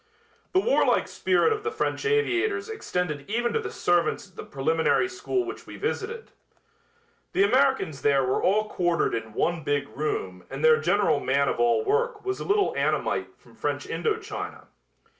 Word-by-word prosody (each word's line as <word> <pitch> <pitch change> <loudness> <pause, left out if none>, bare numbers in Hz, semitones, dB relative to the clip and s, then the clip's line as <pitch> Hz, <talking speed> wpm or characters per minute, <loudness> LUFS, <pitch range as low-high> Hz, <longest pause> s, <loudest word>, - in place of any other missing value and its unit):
The 370 - +5
warlike 470 +6 +2
spirit 375 +4 +2
of 425 - -4
the 445 - -2
French 440 0 -2
aviators 430 -1 +1
extended 180 - -3
even 235 +2 0
to - - +1
the - - -4
servants 175 +3 +1
at 185 - -25
the - - -7
preliminary 160 - +1
school 375 0 -2
which 385 - -8
we - - -9
visited. 460 +1 -4 1.0
The 195 - +4
Americans 225 - +2
there 140 -1 +3
were 130 - 0
all 215 +3 +2
quartered 175 -4 0
in 115 -1 -4
one 170 -1 0
big 145 0 0
room 95 -11 -3
and 135 +3 -2
their 155 -1 +6
general 170 -3 +2
man 140 +1 +1
of - - -1
all 240 - +3
work 445 +1 0
was 385 0 -2
a - - -4
little 405 0 +2
Annamite - - -1
from - - -21
French - - -3
Indo 440 -1 -1
China. - - -7
215 Hz, 175 wpm, -26 LUFS, -, 1.0 s, their